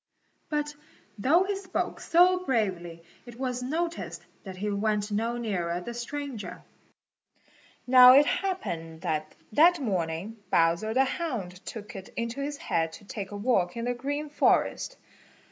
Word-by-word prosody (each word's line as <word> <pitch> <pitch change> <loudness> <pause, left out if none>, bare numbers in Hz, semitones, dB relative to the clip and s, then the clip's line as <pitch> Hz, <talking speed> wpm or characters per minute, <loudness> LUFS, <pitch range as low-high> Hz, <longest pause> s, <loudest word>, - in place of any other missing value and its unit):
But 295 -1 -1 0.5
though 315 - +4
he 400 +1 -2
spoke 385 -1 -3
so 360 +2 +4
bravely 185 - -1 0.2
it 240 0 -11
was 250 -2 -2
noticed 330 +6 -3 0.2
that 190 -2 -8
he 205 +2 -2
went 210 0 0
no 230 +3 -1
nearer 180 -7 -2
the 235 +7 -6
stranger. 250 0 -6 1.2
Now 250 0 +9
it 285 +2 +7
happened 170 - -3
that 155 0 -2 0.2
that 335 +8 +5
morning 190 - -2
Bowser 170 +7 +2
the 265 +1 +5
Hound 230 - -4
took 210 -2 -7
it 195 -1 -8
into 235 +4 -3
his 290 +1 -3
head 165 - -1
to 205 - -12
take 195 -1 -6
a 205 - -6
walk 200 -4 +1
in 230 - -3
the 245 - 0
Green 285 +4 -3
Forest. - - +1
235 Hz, 145 wpm, -28 LUFS, 190-290 Hz, 1.2 s, Now